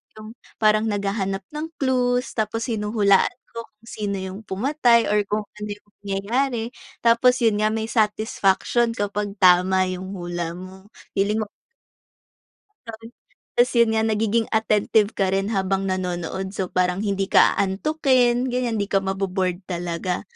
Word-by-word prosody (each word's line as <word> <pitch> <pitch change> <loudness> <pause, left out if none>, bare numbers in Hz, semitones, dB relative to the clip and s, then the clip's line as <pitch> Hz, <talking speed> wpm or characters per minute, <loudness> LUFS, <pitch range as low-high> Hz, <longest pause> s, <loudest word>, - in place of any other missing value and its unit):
yung 215 0 -10 0.3
parang 215 0 +4
naghahanap 195 -2 -2
ng 300 +1 -4
clues, 250 -2 0
tapos 225 +2 -2
hinuhulaan 210 -2 +2 0.2
ko 230 - -6
kung 215 +2 -25
sino 205 -3 -3
yung 190 +1 -6
pumatay 235 +3 +2
or 210 - +3
kung 210 +1 -1 0.2
ano 210 0 -5
yung 205 - -25 0.2
mangyayari, 225 +5 -1 0.4
tapos 245 +2 +4
yun 215 -2 +3
nga 215 - +3
may 220 0 -2
satisfaction 220 +1 +1
kapag 205 -1 -3
tama 185 +1 +5
yung 185 +2 -6
hula 175 -2 -4
mo, 190 +2 -11 0.2
feeling 210 +3 0
mo - - -9 1.4
Gano'n, 225 0 -9 0.5
tapos 245 +1 +4
yun 235 -2 +4
nga - - +3
nagiging 220 +1 +1
attentive 215 -1 +2
ka 190 -1 +1
rin 195 +1 0
habang 195 -2 -1
nanonood 185 +1 -3
so 190 -3 -3
parang 180 +1 0
hindi 200 -2 -1
ka - - +4
aantukin 250 +3 +2
ganyan, 245 -3 -1
di 200 - 0
ka 195 -1 +1
mabo-bored 190 -2 -1
talaga, 175 0 -3
210 Hz, 145 wpm, -23 LUFS, 190-230 Hz, 1.4 s, tama